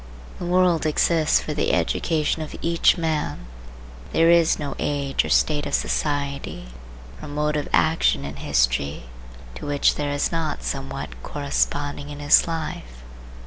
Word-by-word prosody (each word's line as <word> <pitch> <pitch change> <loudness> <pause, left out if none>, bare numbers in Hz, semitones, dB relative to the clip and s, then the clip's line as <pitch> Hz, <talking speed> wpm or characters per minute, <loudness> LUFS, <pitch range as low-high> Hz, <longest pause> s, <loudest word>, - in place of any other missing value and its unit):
The 175 - -4
world 180 -3 +3
exists 160 +1 +3
for 150 - -4
the 150 - 0
education 160 -1 0
of 155 - -6
each 170 +3 +3
man. 155 - -2 0.7
There 165 +1 +5
is 170 -1 +4
no 145 -2 -4
age 140 -2 0
or - - -5
state 150 -2 +2
of - - 0
society 140 - -2 0.5
or - - -8
mode 150 +1 -1
of 150 - -2
action 160 - +2
in 70 0 -7
history 70 +1 0 0.5
to 65 - -8
which 145 -1 +2
there 145 -1 -3
is 145 0 0
not 160 - -2
somewhat - - -5
corresponding 145 - -2
in 145 - -7
his 145 +2 +5
life. 65 - -5
145 Hz, 145 wpm, -23 LUFS, 135-160 Hz, 0.7 s, There